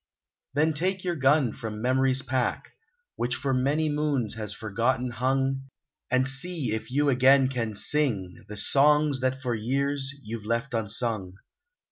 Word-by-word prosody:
Then 155 Hz, +2 st, +3 dB
take 185 Hz, +5 st, -1 dB
your 175 Hz, -2 st, -1 dB
gun 135 Hz, -4 st, +3 dB
from 110 Hz, -1 st, -6 dB
memory's 130 Hz, +2 st, +2 dB
rack 130 Hz, -2 st, -1 dB, 0.5 s
Which 120 Hz, +1 st, -1 dB
for 135 Hz, 0 st, -2 dB
many 140 Hz, +5 st, +1 dB
moons 145 Hz, -6 st, 0 dB
has 110 Hz, -2 st, -5 dB
forgotten 120 Hz, +4 st, -1 dB
hung 135 Hz, +2 st, -1 dB, 0.4 s
And 130 Hz, +1 st, +2 dB
see 140 Hz, -2 st, -2 dB
if 110 Hz, +2 st, -4 dB
you 145 Hz, +3 st, +2 dB
again 130 Hz, +1 st, +5 dB
can 115 Hz, -5 st, -3 dB
sing, 115 Hz, -6 st, 0 dB
The 105 Hz, -, -7 dB
songs 145 Hz, +4 st, +4 dB
that 130 Hz, 0 st, -1 dB
for 125 Hz, -2 st, -1 dB
years, 135 Hz, +4 st, -1 dB
you've 110 Hz, 0 st, -6 dB
left 115 Hz, +4 st, -2 dB
unsung. 110 Hz, -3 st, -1 dB
130 Hz, 145 wpm, -27 LUFS, 115-140 Hz, 0.5 s, again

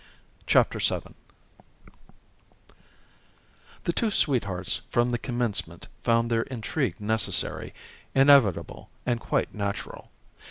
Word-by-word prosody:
CHAPTER -, -, +3 dB
VII -, -, -1 dB, 2.7 s
The -, -, -1 dB
two 230 Hz, -, +1 dB
sweethearts 100 Hz, -, 0 dB
from 120 Hz, +1 st, +1 dB
the 120 Hz, -, -1 dB
commencement 120 Hz, -4 st, -3 dB
found 115 Hz, 0 st, +1 dB
their 115 Hz, -1 st, +2 dB
intrigue 130 Hz, +2 st, -3 dB
necessary, 110 Hz, +1 st, +1 dB, 0.4 s
inevitable 135 Hz, -, +4 dB, 0.2 s
and 120 Hz, -2 st, 0 dB
quite -, -, -1 dB
natural. 100 Hz, -2 st, -5 dB
115 Hz, 90 wpm, -26 LUFS, 105-130 Hz, 2.7 s, inevitable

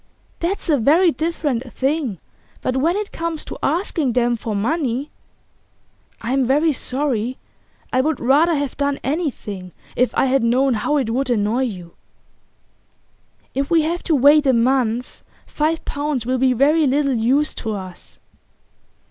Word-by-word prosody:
'That's 370 Hz, +4 st, -2 dB
a 295 Hz, -5 st, +3 dB
very 325 Hz, +9 st, +4 dB
different 295 Hz, -7 st, -2 dB
thing. 270 Hz, -, -1 dB, 0.4 s
But 255 Hz, -, -1 dB
when 320 Hz, +7 st, +1 dB
it 420 Hz, 0 st, -3 dB
comes 330 Hz, -1 st, -4 dB
to -, -, -7 dB
asking 320 Hz, -, 0 dB
them 240 Hz, 0 st, +2 dB
for 220 Hz, -2 st, -4 dB
money 265 Hz, +4 st, -1 dB, 0.5 s
' -, -, -39 dB
'I'm 260 Hz, +3 st, +1 dB
very 300 Hz, +5 st, +3 dB
sorry. 255 Hz, -3 st, -2 dB, 0.6 s
I 255 Hz, -, +4 dB
would 305 Hz, +1 st, -1 dB
rather 300 Hz, +7 st, +3 dB
have 285 Hz, -3 st, -2 dB
done 280 Hz, 0 st, 0 dB
anything 225 Hz, -, -3 dB, 0.2 s
if 250 Hz, +1 st, +2 dB
I -, -, +3 dB
had 270 Hz, 0 st, +2 dB
known 255 Hz, +3 st, +2 dB
how 235 Hz, +7 st, 0 dB
it 250 Hz, -5 st, -1 dB
would 260 Hz, +2 st, -1 dB
annoy 235 Hz, +3 st, +1 dB
you.' 180 Hz, -7 st, -7 dB, 1.6 s
'If 275 Hz, +1 st, -2 dB
we 330 Hz, -2 st, +4 dB
have 340 Hz, +3 st, -2 dB
to 320 Hz, -, +4 dB
wait 290 Hz, +2 st, +5 dB
a 265 Hz, -, +4 dB
month, 245 Hz, 0 st, 0 dB, 0.2 s
five 310 Hz, +2 st, -1 dB
pounds 285 Hz, -4 st, -2 dB
will 255 Hz, +1 st, 0 dB
be 260 Hz, 0 st, +3 dB
very 295 Hz, +5 st, +3 dB
little 275 Hz, +1 st, +1 dB
use 255 Hz, +6 st, +1 dB
to 220 Hz, -2 st, -3 dB
us. 185 Hz, -2 st, -9 dB
270 Hz, 155 wpm, -20 LUFS, 240-300 Hz, 1.6 s, wait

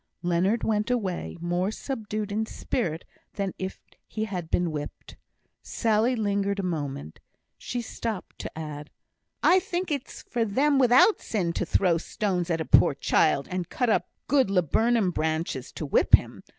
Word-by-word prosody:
Leonard 180 Hz, +6 st, +1 dB
went 210 Hz, 0 st, 0 dB
away, 200 Hz, -10 st, -2 dB
more 175 Hz, +3 st, 0 dB
subdued 215 Hz, -3 st, -4 dB
in 215 Hz, +2 st, 0 dB
spirit 170 Hz, -10 st, -3 dB, 0.3 s
than 195 Hz, -2 st, -2 dB
if 190 Hz, 0 st, -5 dB, 0.3 s
he 220 Hz, 0 st, -3 dB
had 180 Hz, -6 st, -5 dB
been 175 Hz, -1 st, +1 dB
whipped. 150 Hz, -1 st, -7 dB, 0.5 s
Sally 225 Hz, +3 st, +1 dB
lingered 200 Hz, -2 st, 0 dB
a 195 Hz, -, -2 dB
moment. 145 Hz, -, -4 dB, 0.4 s
She 245 Hz, -, -4 dB
stopped 225 Hz, -3 st, -5 dB
to -, -, -7 dB
add: 150 Hz, -2 st, -6 dB, 0.5 s
"I 370 Hz, -, +6 dB
think 360 Hz, -1 st, -3 dB
it's 280 Hz, -2 st, -4 dB
for 240 Hz, -2 st, -1 dB
them 270 Hz, +7 st, +2 dB
without 255 Hz, -, +5 dB
sin 180 Hz, -6 st, -1 dB
to 180 Hz, -, -2 dB
throw 175 Hz, -3 st, +2 dB
stones 180 Hz, -1 st, -2 dB
at 165 Hz, -1 st, 0 dB
a 160 Hz, -, -2 dB
poor -, -, +5 dB
child, 140 Hz, -, +2 dB
and 180 Hz, -1 st, -3 dB
cut 245 Hz, -3 st, 0 dB
up -, -, +1 dB, 0.2 s
good 265 Hz, -5 st, +3 dB
laburnum 200 Hz, +3 st, +2 dB
branches 155 Hz, -4 st, -2 dB
to 155 Hz, -, -5 dB
whip 140 Hz, -, +6 dB
him. -, -, -5 dB
200 Hz, 160 wpm, -26 LUFS, 170-230 Hz, 0.5 s, I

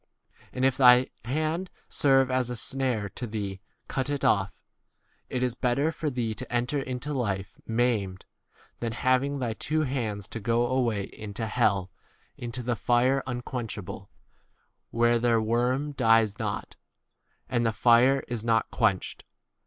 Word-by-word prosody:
43 -, -, -14 dB
And 130 Hz, -, +2 dB
if 135 Hz, -1 st, +2 dB
thy 125 Hz, -1 st, +7 dB, 0.2 s
hand 155 Hz, +7 st, -1 dB, 0.2 s
serve 135 Hz, -2 st, +3 dB
as 130 Hz, -1 st, +1 dB
a 125 Hz, -, -3 dB
snare 125 Hz, -3 st, -1 dB
to 120 Hz, -, -6 dB
thee, 100 Hz, -3 st, -4 dB, 0.3 s
cut 130 Hz, +1 st, -2 dB
it 145 Hz, -2 st, -1 dB
off: 100 Hz, -1 st, +2 dB, 0.7 s
it 125 Hz, -, -1 dB
is 125 Hz, -2 st, +1 dB
better 135 Hz, +5 st, +1 dB
for 160 Hz, -2 st, -3 dB
thee 120 Hz, -4 st, -2 dB
to 130 Hz, +4 st, -7 dB
enter 125 Hz, +4 st, 0 dB
into 130 Hz, +2 st, -4 dB
life 100 Hz, -5 st, -3 dB
maimed, 110 Hz, -5 st, 0 dB, 0.5 s
than 115 Hz, -1 st, -3 dB
having 130 Hz, +4 st, +1 dB
[thy] 120 Hz, -4 st, -2 dB
two 155 Hz, +8 st, -1 dB
hands 110 Hz, -8 st, -3 dB
to 115 Hz, -, -5 dB
go 115 Hz, +3 st, +1 dB
away 120 Hz, -5 st, 0 dB
into 105 Hz, +3 st, -6 dB
hell, 100 Hz, -5 st, +1 dB, 0.4 s
w -, -, -8 dB
into 120 Hz, +1 st, -4 dB
the 120 Hz, 0 st, 0 dB
fire 125 Hz, +4 st, +2 dB
un 120 Hz, -1 st, -3 dB
44 -, -, -11 dB, 0.3 s
quenchable; 100 Hz, +1 st, -9 dB, 0.8 s
where 120 Hz, 0 st, +3 dB
their 115 Hz, -1 st, +3 dB
worm 125 Hz, +6 st, 0 dB
dies 115 Hz, -4 st, +3 dB
not, 105 Hz, -3 st, -4 dB, 0.7 s
and 120 Hz, -2 st, 0 dB
the 115 Hz, -, +2 dB
fire 120 Hz, +4 st, +4 dB
is 120 Hz, -3 st, -3 dB
not 115 Hz, -1 st, +2 dB
45 -, -, -13 dB
quenched. -, -, +1 dB
120 Hz, 160 wpm, -27 LUFS, 110-130 Hz, 0.8 s, thy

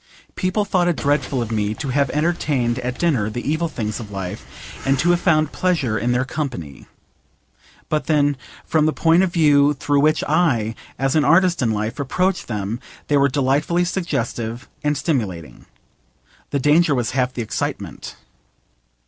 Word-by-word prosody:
People 195 Hz, +3 st, 0 dB
thought 180 Hz, -3 st, +1 dB
it 175 Hz, -, +2 dB
dreadful 145 Hz, -3 st, 0 dB
of 115 Hz, -, -7 dB
me 105 Hz, -1 st, -1 dB
to 145 Hz, +2 st, -5 dB
have 140 Hz, 0 st, +1 dB
entertained 145 Hz, -6 st, 0 dB
at 125 Hz, 0 st, -4 dB
dinner 135 Hz, -12 st, +1 dB
the 120 Hz, +4 st, -5 dB
evil 160 Hz, +3 st, 0 dB
things 110 Hz, -8 st, -4 dB
of 110 Hz, -3 st, -8 dB
life, 95 Hz, -3 st, -8 dB
and 135 Hz, 0 st, +2 dB
to 175 Hz, +6 st, +3 dB
have 175 Hz, -, +2 dB
found 155 Hz, -4 st, +2 dB
pleasure 160 Hz, -12 st, 0 dB
in 120 Hz, +3 st, 0 dB
their 125 Hz, +1 st, +1 dB
company. 120 Hz, -, -5 dB, 1.0 s
But 155 Hz, -, -1 dB
then, 145 Hz, -2 st, +3 dB, 0.3 s
from 155 Hz, -1 st, +2 dB
the 155 Hz, -, +1 dB
point 165 Hz, +2 st, +3 dB
of 190 Hz, -2 st, +1 dB
view 150 Hz, -4 st, +4 dB
through 145 Hz, +1 st, +1 dB
which 155 Hz, +2 st, +3 dB
I, 145 Hz, -9 st, +1 dB, 0.2 s
as 135 Hz, +2 st, 0 dB
an 155 Hz, -, +4 dB
artist 170 Hz, +3 st, +4 dB
in 120 Hz, -, +2 dB
life, 110 Hz, +3 st, -3 dB
approach 180 Hz, +7 st, 0 dB
them 105 Hz, +1 st, -3 dB, 0.3 s
they 145 Hz, -, +4 dB
were 140 Hz, 0 st, +4 dB
delightfully 145 Hz, +6 st, +1 dB
suggestive 120 Hz, -9 st, -3 dB, 0.2 s
and 150 Hz, 0 st, +1 dB
stimulating. 105 Hz, -, -3 dB, 0.8 s
The -, -, -1 dB
danger 150 Hz, +2 st, +4 dB
was 120 Hz, -3 st, -1 dB
half 130 Hz, -1 st, 0 dB
the 120 Hz, -, -2 dB
excitement. 110 Hz, -, -4 dB
140 Hz, 165 wpm, -21 LUFS, 120-160 Hz, 1.0 s, view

